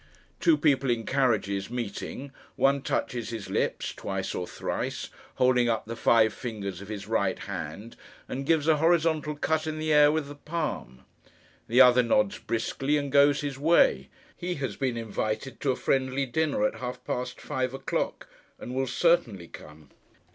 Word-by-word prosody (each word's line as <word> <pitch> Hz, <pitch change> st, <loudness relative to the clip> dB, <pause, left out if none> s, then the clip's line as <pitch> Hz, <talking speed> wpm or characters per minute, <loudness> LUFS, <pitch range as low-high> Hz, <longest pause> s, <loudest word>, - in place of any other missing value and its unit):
Two 330 Hz, -2 st, +4 dB
people 140 Hz, -, +2 dB
in 115 Hz, -2 st, 0 dB
carriages, 110 Hz, -7 st, 0 dB
meeting, 125 Hz, +3 st, -5 dB, 0.2 s
one 140 Hz, 0 st, +3 dB
touches 120 Hz, -3 st, -2 dB
his 115 Hz, -4 st, -6 dB
lips, -, -, -1 dB
twice 95 Hz, -1 st, -4 dB
or 90 Hz, -, -3 dB
thrice, -, -, -4 dB, 0.3 s
holding 125 Hz, -1 st, +3 dB
up 110 Hz, -2 st, -1 dB
the 115 Hz, +1 st, -6 dB
five 110 Hz, -1 st, +4 dB
fingers 100 Hz, -6 st, -5 dB
of 100 Hz, -, -9 dB
his 105 Hz, -2 st, -6 dB
right 100 Hz, -4 st, 0 dB
hand, 115 Hz, +3 st, -7 dB, 0.3 s
and 135 Hz, +1 st, -5 dB
gives 160 Hz, -2 st, +2 dB
a 160 Hz, -1 st, +5 dB
horizontal 160 Hz, -1 st, +2 dB
cut 160 Hz, +1 st, 0 dB
in 155 Hz, 0 st, -3 dB
the 155 Hz, 0 st, 0 dB
air 150 Hz, 0 st, +7 dB
with 155 Hz, -2 st, -1 dB
the 145 Hz, -, -8 dB
palm. 150 Hz, -, -5 dB, 0.6 s
The 125 Hz, +3 st, +5 dB
other 125 Hz, -1 st, +7 dB
nods 105 Hz, -4 st, +1 dB
briskly, 135 Hz, +5 st, -1 dB
and 140 Hz, -1 st, -3 dB
goes 140 Hz, +1 st, +5 dB
his 140 Hz, -2 st, -4 dB
way. 140 Hz, -, +3 dB, 0.3 s
He 180 Hz, 0 st, -3 dB
has 135 Hz, -8 st, -3 dB
been 130 Hz, -1 st, -1 dB
invited 110 Hz, +2 st, -3 dB
to 140 Hz, -, +1 dB
a -, -, -1 dB
friendly 135 Hz, +1 st, 0 dB
dinner 160 Hz, -, 0 dB
at 265 Hz, -, -1 dB
half 125 Hz, 0 st, -6 dB
past 125 Hz, 0 st, -3 dB
five 130 Hz, -3 st, -2 dB
o'clock, 135 Hz, 0 st, -3 dB, 0.3 s
and 125 Hz, -, -7 dB
will 135 Hz, +1 st, 0 dB
certainly 125 Hz, -, +1 dB
come. 75 Hz, -1 st, -13 dB
130 Hz, 170 wpm, -27 LUFS, 110-145 Hz, 0.6 s, air